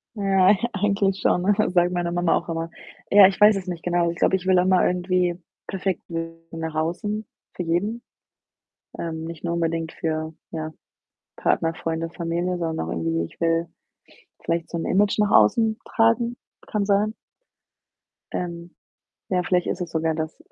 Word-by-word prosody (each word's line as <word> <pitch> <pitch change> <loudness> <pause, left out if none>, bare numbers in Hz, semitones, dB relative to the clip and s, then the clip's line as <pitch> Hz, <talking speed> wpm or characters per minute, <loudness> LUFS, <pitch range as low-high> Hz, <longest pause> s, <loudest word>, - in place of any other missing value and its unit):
Ja, 195 -1 +4 0.2
eigentlich 200 -1 +1
schon, 180 - +2
ne, 205 +2 +4 0.2
sage 175 -1 +3
ich 180 - -5
meiner 175 -1 -1
Mama 175 -1 +2
auch 170 - -3
immer. 165 0 -3 0.4
Ja, 200 -1 +9
ich 190 0 -3
weiß 210 0 +7
es 190 -1 -6
nicht 175 -2 -5
genau. 175 -1 +1
Ich 170 - -5
glaube, 190 - +3
ich 185 - -4
will 185 -1 +5
auch 180 - +2
mal 185 -1 +4
irgendwie 180 -1 0 0.3
perfekt 190 -1 -2
wirken 165 0 -6
nach 160 -1 -4
außen 195 +7 -2 0.3
für 180 - -3
jeden, 195 +8 -1 1.0
ähm, 160 -1 -4
nicht 165 -1 -8
nur 170 -1 -1
unbedingt 165 -1 -1
für, 160 0 -3 0.2
ja, 155 -1 -4 0.7
Partner, 165 0 +1
Freunde, 165 0 -3
Familie, 175 +1 -2
sondern 165 -2 -2
auch - - -4
irgendwie, 80 0 -1
ich - - -15
will 165 0 +2 0.8
vielleicht 165 -1 -1
so - - -5
'n 165 - -2
Image 200 +2 +2
nach 210 -1 +3
außen 220 - +4
tragen 230 +1 +2 0.3
kann 210 -1 -1
sein. 205 +2 +2 1.2
Ähm, 170 -1 -5 0.6
ja, 180 -1 +2
vielleicht 180 0 +1
ist 180 - -2
es 175 -2 -4
sogar 160 0 0
das, 160 0 -5
175 Hz, 175 wpm, -24 LUFS, 165-195 Hz, 1.2 s, Ja